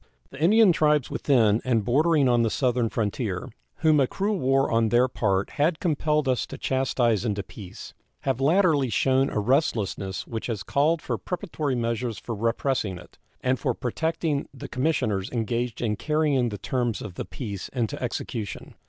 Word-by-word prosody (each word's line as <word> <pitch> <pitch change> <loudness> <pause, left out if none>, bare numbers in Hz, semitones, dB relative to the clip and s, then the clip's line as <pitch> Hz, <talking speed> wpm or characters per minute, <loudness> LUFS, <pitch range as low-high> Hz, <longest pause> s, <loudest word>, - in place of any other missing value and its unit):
The 135 - -10
Indian 210 +4 +6
tribes 150 -4 +2
within 115 -6 +3
and 115 -6 +1
bordering 150 +3 +3
on 120 -1 +3
the 115 - +2
southern 125 -1 +1
frontier, 105 0 -2 0.3
whom 155 -2 +4
a 135 - +3
cruel 200 +5 -1
war 135 0 +2
on 115 -1 +2
their 120 +2 +4
part 100 -6 0
had 155 +2 +2
compelled 150 -3 +1
us 130 -2 0
to - - -8
chastise 125 -5 +1
into 105 -4 -1
peace, 100 -4 -10 0.3
have 135 -1 -1
latterly 155 -3 +3
shown 130 +5 +2
a - - -4
restlessness 105 - 0
which 115 -2 -5
has 110 -5 -3
called 150 +8 +1
for - - -2
preparatory 160 -7 -3
measures 115 -1 -2
for 115 - -5
repressing 115 -2 -1
it, 90 - -15 0.2
and 130 0 +1
for 130 -5 -1
protecting 160 +3 -2
the 135 - -9
commissioners 110 -9 0
engaged 120 0 -2
in 105 -2 0
carrying 150 -2 +1
the 105 - -5
terms 120 0 -2
of 100 - -7
the - - -4
peace 100 -7 -6
into 120 -5 -3
execution. 110 -3 -5
125 Hz, 170 wpm, -25 LUFS, 110-145 Hz, 0.3 s, Indian